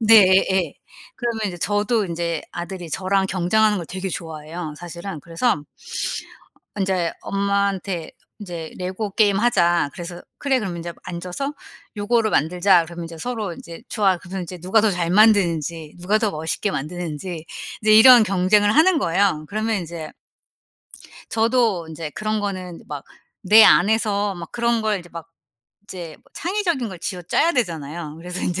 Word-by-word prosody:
네. 225 Hz, 0 st, +7 dB, 0.3 s
예예. 185 Hz, -5 st, +1 dB, 0.4 s
그러면 235 Hz, -3 st, -2 dB
인제 175 Hz, -2 st, -5 dB
저도 205 Hz, +3 st, +1 dB
인제 170 Hz, -1 st, -2 dB
아들이 175 Hz, 0 st, -6 dB
저랑 190 Hz, +1 st, +1 dB
경쟁하는 205 Hz, +4 st, +2 dB
걸 170 Hz, -, -5 dB
되게 190 Hz, +1 st, -4 dB
좋아해요 160 Hz, -1 st, -6 dB
사실은. 175 Hz, 0 st, -7 dB
그래서 165 Hz, -, 0 dB, 1.2 s
인제 185 Hz, -3 st, 0 dB
엄마한테 200 Hz, -3 st, -1 dB, 0.3 s
인제 170 Hz, -5 st, -7 dB
"레고 190 Hz, +3 st, -4 dB
게임하자." 195 Hz, -7 st, +3 dB
그래서 175 Hz, 0 st, -7 dB, 0.2 s
"그래. 275 Hz, -2 st, +1 dB
그럼 185 Hz, -5 st, -4 dB
인제 170 Hz, 0 st, -5 dB
앉아서 180 Hz, -, -4 dB, 0.4 s
요거를 220 Hz, +1 st, +1 dB
만들자." 175 Hz, +2 st, +3 dB
그러면 170 Hz, 0 st, -7 dB
인제 165 Hz, -1 st, -9 dB
서로 220 Hz, -4 st, -3 dB
인제 170 Hz, 0 st, -11 dB
"좋아." 195 Hz, -4 st, +2 dB
그러면 185 Hz, +1 st, -6 dB
이제 180 Hz, +1 st, -8 dB
누가 185 Hz, +6 st, +2 dB
더 215 Hz, -1 st, +3 dB
잘 175 Hz, -2 st, -1 dB
만드는지 170 Hz, -7 st, +3 dB
누가 200 Hz, +5 st, +2 dB
더 215 Hz, -2 st, +1 dB
멋있게 160 Hz, +6 st, -2 dB
만드는지 165 Hz, +2 st, -5 dB, 0.4 s
이제 215 Hz, 0 st, +4 dB
이런 235 Hz, +1 st, +9 dB
경쟁을 205 Hz, +2 st, +3 dB
하는 325 Hz, +1 st, +5 dB
거예요. 175 Hz, -, +1 dB
그러면 220 Hz, +1 st, -1 dB
인제 165 Hz, -2 st, -7 dB, 1.2 s
저도 225 Hz, -6 st, +2 dB
인제 160 Hz, -1 st, -6 dB
그런 215 Hz, +5 st, -2 dB
거는 185 Hz, -4 st, -5 dB
막 145 Hz, -2 st, -6 dB, 0.4 s
내 220 Hz, +1 st, +9 dB
안에서 205 Hz, 0 st, +4 dB
막 170 Hz, -2 st, -8 dB
그런 235 Hz, -1 st, 0 dB
걸 215 Hz, -2 st, +1 dB
이제 175 Hz, -, -12 dB
막 165 Hz, 0 st, -9 dB, 0.5 s
이제 175 Hz, -6 st, -8 dB
뭐 -, -, -30 dB
창의적인 345 Hz, -, -1 dB
걸 185 Hz, -3 st, -8 dB
쥐어짜야 185 Hz, -, 0 dB
되잖아요. 160 Hz, -, -3 dB
그래서 180 Hz, +2 st, -6 dB
인제 180 Hz, +1 st, -1 dB
185 Hz, 330 characters per minute, -22 LUFS, 170-215 Hz, 1.2 s, 이런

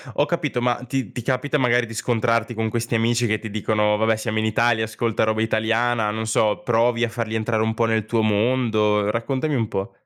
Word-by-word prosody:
Ho 145 Hz, -, +2 dB
capito, 150 Hz, -7 st, -2 dB
ma 120 Hz, 0 st, +2 dB
ti 125 Hz, -4 st, -3 dB
ti 125 Hz, -, -5 dB
capita, 130 Hz, +4 st, -1 dB
magari, 125 Hz, -2 st, +2 dB
di 115 Hz, -, -10 dB
scontrarti 115 Hz, 0 st, 0 dB
con 110 Hz, 0 st, -2 dB
questi 115 Hz, +1 st, -2 dB
amici 115 Hz, +1 st, +1 dB
che 110 Hz, 0 st, 0 dB
ti 110 Hz, -, -7 dB
dicono: 105 Hz, 0 st, +1 dB
"Vabbè, 110 Hz, +1 st, +2 dB
siamo 110 Hz, 0 st, -2 dB
in 110 Hz, -, 0 dB
Italia, 110 Hz, +1 st, +2 dB
ascolta 115 Hz, 0 st, -1 dB
roba 110 Hz, 0 st, 0 dB
italiana", 110 Hz, 0 st, +1 dB
non 110 Hz, +1 st, -3 dB
so, 110 Hz, -1 st, +1 dB
provi 120 Hz, 0 st, +2 dB
a 120 Hz, -, +1 dB
farli 110 Hz, -1 st, -4 dB
entrare 110 Hz, 0 st, 0 dB
un 110 Hz, 0 st, 0 dB
po' 115 Hz, +1 st, +1 dB
nel 110 Hz, -2 st, 0 dB
tuo 115 Hz, +1 st, 0 dB
mondo, 110 Hz, -1 st, +1 dB
raccontami 135 Hz, +6 st, -2 dB
un 115 Hz, -4 st, 0 dB
po'. 95 Hz, -1 st, -4 dB
115 Hz, 215 wpm, -22 LUFS, 110-120 Hz, -, Ho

